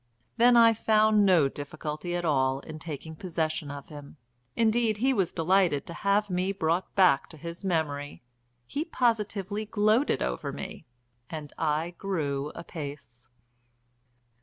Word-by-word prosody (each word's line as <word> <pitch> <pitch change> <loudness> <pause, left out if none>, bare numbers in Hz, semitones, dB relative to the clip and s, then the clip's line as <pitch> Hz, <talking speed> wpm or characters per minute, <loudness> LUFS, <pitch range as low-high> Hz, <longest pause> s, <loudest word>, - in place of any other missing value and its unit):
Then 240 +1 +6
I 230 -1 +7
found 215 -1 +3
no 170 -7 +5
difficulty 150 +4 -5
at 175 0 -2
all 135 -3 +1
in 155 +1 -9
taking 160 0 -7
possession 160 -3 -2
of 140 0 -8
him; 145 0 -11 0.4
indeed 225 -1 +2
he 265 +5 +2
was 190 -7 +1
delighted 170 -3 +2
to 170 - -8
have 200 +4 +1
me 185 0 0
brought 170 -1 -1
back 180 -8 +4
to 160 - -11
his 170 +4 -8
memory, 145 -7 -2 0.4
he 285 - -3
positively 215 - -1
gloated 215 +5 +2
over - - -3
me, - - -8 0.4
and 155 -3 -7
I 160 +2 0
grew 150 -8 -2
apace. 145 -7 -8
170 Hz, 135 wpm, -28 LUFS, 150-210 Hz, 0.4 s, I